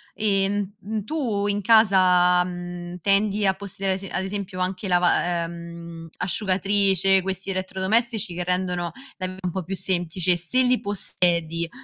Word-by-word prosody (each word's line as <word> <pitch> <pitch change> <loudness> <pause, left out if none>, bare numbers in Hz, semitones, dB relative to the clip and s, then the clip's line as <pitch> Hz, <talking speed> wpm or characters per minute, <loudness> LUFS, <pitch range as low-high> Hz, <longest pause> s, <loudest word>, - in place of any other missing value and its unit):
e, 195 -2 +1
mh 205 -1 -2
mhmm, 215 0 -4
tu 235 -10 -2
in 205 0 0
casa, 185 -5 +5
mhmm, 175 0 -7
tendi 200 +2 +2
a 190 - +3
possedere 195 0 -3
a - - -1
ese 195 +1 -6
ad 190 - -2
esempio 195 -1 -5
anche 185 +2 -2
lava 175 -1 +2
ehm, 170 -1 -9
asciugatrice, 195 -1 +2
questi 190 +1 -3
elettrodomestici 195 +2 -1
che 180 +1 -3
rendono 180 -1 -1 0.3
la 185 -1 -3
v 185 0 -8
un 180 - -1
po' 190 +1 -4
più 190 +4 -4
semplice. 180 -1 +1
Se 255 +10 +3
li 250 0 +2
possiedi, 170 -4 0
190 Hz, 155 wpm, -24 LUFS, 175-200 Hz, 0.3 s, casa